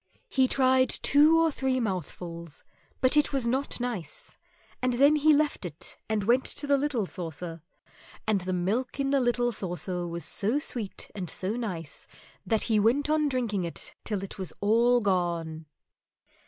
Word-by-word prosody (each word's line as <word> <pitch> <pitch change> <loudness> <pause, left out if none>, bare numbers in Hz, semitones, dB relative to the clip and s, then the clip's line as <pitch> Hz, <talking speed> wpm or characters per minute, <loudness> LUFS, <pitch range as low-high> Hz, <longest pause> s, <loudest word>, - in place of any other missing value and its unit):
He 260 -1 +3
tried 260 0 +3
two 305 +3 +5
or 330 -1 +3
three 265 -2 0
mouthfuls, 170 - -4 0.4
but 255 +2 +4
it 295 - +3
was 270 -4 0
not 265 +3 0
nice, 230 -11 -4 0.5
and 255 -1 +1
then 280 +5 +5
he 305 +1 +5
left 300 -4 +2
it 165 -4 -7
and 215 -2 0
went 245 +5 +3
to 290 - -3
the 285 0 +4
little 270 -7 0
saucer, 170 -2 -6 0.6
and 210 -3 +1
the 185 +1 -3
milk 205 +10 -1
in 275 0 0
the 280 - +4
little 240 0 +1
saucer 180 -3 -3
was 170 0 -5
so 220 +7 0
sweet 240 -9 -4
and 185 -5 -4
so 195 +4 -1
nice 185 -11 -5 0.4
that 220 -2 +1
he 220 -3 +2
went 265 +8 +2
on 305 -1 +2
drinking 235 -8 -1
it 170 - -4
till 205 -3 -3
it 195 - -7
was 185 - -2
all 235 +4 +4
gone. 170 -5 -1
225 Hz, 165 wpm, -28 LUFS, 180-265 Hz, 0.6 s, two